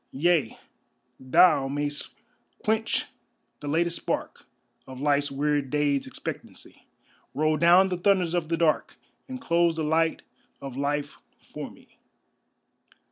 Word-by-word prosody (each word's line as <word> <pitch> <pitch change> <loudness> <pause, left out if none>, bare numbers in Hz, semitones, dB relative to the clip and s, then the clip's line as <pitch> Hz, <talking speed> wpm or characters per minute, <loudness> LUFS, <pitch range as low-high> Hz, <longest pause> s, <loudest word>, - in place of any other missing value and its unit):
Yea, 155 -3 +1 0.6
thou 135 +2 +4
mayst 145 +1 -4 0.5
quench 220 +1 +1 0.5
the 145 - -8
latest 170 +3 0
spark - - -4 0.4
Of 130 -1 -9
life's 145 0 +1
weird 145 0 -1
day's 145 -2 0
expectancy, - - -9 0.5
Roll 155 +1 +2
down 175 +4 +5
the 180 - -2
thunders 180 -2 +2
of 170 -3 -1
the 165 - 0
dark 165 -2 +1 0.3
And 260 0 -6
close 170 -8 +2
the 160 - -2
light 160 +1 +1 0.4
of 135 -2 -8
life 145 +1 -2 0.2
for - - -8
me. - - -21
155 Hz, 125 wpm, -26 LUFS, 145-170 Hz, 0.6 s, down